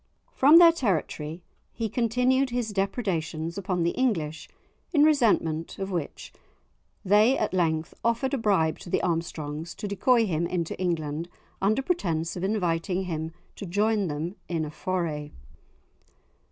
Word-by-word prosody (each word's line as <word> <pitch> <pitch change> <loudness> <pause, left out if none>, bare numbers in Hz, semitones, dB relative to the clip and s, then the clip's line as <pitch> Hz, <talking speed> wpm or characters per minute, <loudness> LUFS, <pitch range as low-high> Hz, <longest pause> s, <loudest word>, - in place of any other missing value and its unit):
From 290 +5 +7
their 340 -1 +9
territory 170 - -2 0.3
he 230 -2 -3
continued 250 +4 +1
his 240 -3 -2
depredations 180 -6 -2
upon 185 -3 -1
the 170 - +2
English, 165 -12 -1 0.4
in 295 -4 +4
resentment 215 - +2
of 195 0 -4
which 170 -5 -5 0.7
they 210 +7 +5
at - - -1
length 160 -3 0
offered 235 +4 0
a - - +2
bribe 190 -8 +1
to - - -10
the - - 0
Armstrongs 160 -2 -3
to 205 - -5
decoy 225 +4 +3
him 170 -3 -1
into 170 -2 -2
England 165 -2 -2 0.3
under 215 +7 +2
pretence 170 - -1
of 180 - -5
inviting 185 -2 0
him 160 -3 -4 0.2
to 200 - -7
join 205 +2 +1
them 160 +5 -4
in 165 -3 -1
a 150 - -7
foray. 160 -4 -3
185 Hz, 140 wpm, -26 LUFS, 165-225 Hz, 0.7 s, their